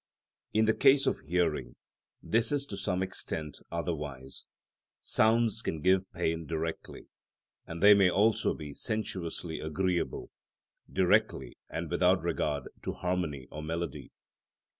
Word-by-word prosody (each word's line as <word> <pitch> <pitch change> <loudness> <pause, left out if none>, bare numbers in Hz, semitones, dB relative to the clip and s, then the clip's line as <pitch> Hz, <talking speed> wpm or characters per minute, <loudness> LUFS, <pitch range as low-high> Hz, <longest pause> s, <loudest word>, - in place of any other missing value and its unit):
In 110 +1 +3
the 110 - +4
case 135 +2 +5
of - - +1
hearing 85 0 -1 0.5
this 115 +3 +2
is 145 -1 +1
to 105 - -7
some 95 -1 -1
extent 80 -5 -3
otherwise; 75 -6 -5 0.5
sounds 115 0 +2
can 80 - -3
give 95 +3 +2
pain 85 -3 -2
directly, 80 0 -4 0.6
and 85 +2 -6
they 105 +1 +10
may 100 -2 +5
also 105 +4 +2
be 75 -2 -8
sensuously 95 - -3
agreeable, 90 +3 -2 0.6
directly 65 -2 +2 0.2
and - - -4
without - - +3
regard 75 -2 -1 0.2
to - - -3
harmony 90 -7 -2
or 75 - -6
melody. 85 +2 -4
90 Hz, 125 wpm, -30 LUFS, 80-105 Hz, 0.6 s, they